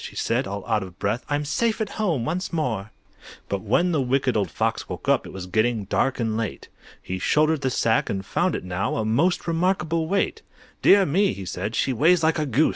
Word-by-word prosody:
she - - -8
said, - - 0
all 100 0 -5
out 110 -2 +1
of 95 -2 -9
breath, 105 +5 -1
"I'm 145 0 0
safe 220 +11 0
at 215 -2 -1
home 160 - 0
once 180 +6 -2
more!" 120 - -2 0.6
But 100 -1 -2
when 175 - +2
the 155 -4 +1
Wicked 130 -1 +1
Old 100 -5 +1
Fox - - -2
woke - - -7
up, - - +2
It - - -9
was 95 -1 -7
getting 110 +3 +1
dark 135 +7 0
and 115 -2 0
late. 110 -2 -4 0.3
He 95 0 -4
shouldered 155 - +2
the 135 - +1
sack, 115 -2 +1
and 95 -1 -3
found - - 0
it - - -4
now 90 +1 -2
A 110 - -1
most 150 +12 +1
remarkable 165 -1 0
weight. 195 +3 0 0.4
"Dear 195 0 +6
me!" 190 +6 +2
he 95 - -7
said, 95 +5 -4
"she 135 - +1
weighs 160 +7 +4
like 160 0 +2
a 150 - -1
goose! 135 +5 +3
130 Hz, 220 wpm, -24 LUFS, 105-165 Hz, 0.6 s, Dear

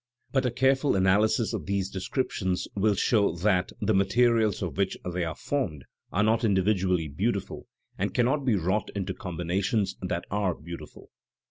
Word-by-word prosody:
But 135 -2 +2
a - - -1
careful 135 +2 +2
analysis 105 +5 +3
of 100 -7 -4
these 100 -1 0
descriptions 95 -2 -2
will 105 +1 +2
show 100 -4 +2
that 90 0 +1
the 110 +1 +1
materials 110 +2 +3
of - - -4
which 100 -1 0
they 90 0 -2
are 80 -2 -3
formed 90 - -2 0.3
are 100 - +2
not 110 +2 +2
individually 95 -4 +2
beautiful 100 +8 -3 0.3
and - - 0
cannot 130 +4 +1
be 125 -5 +2
wrought 95 +3 0
into 95 -2 -2
combinations 95 +1 -1
that 90 -2 -3
are 100 -4 0
beautiful. 85 +2 -10
100 Hz, 155 wpm, -27 LUFS, 90-115 Hz, 0.3 s, analysis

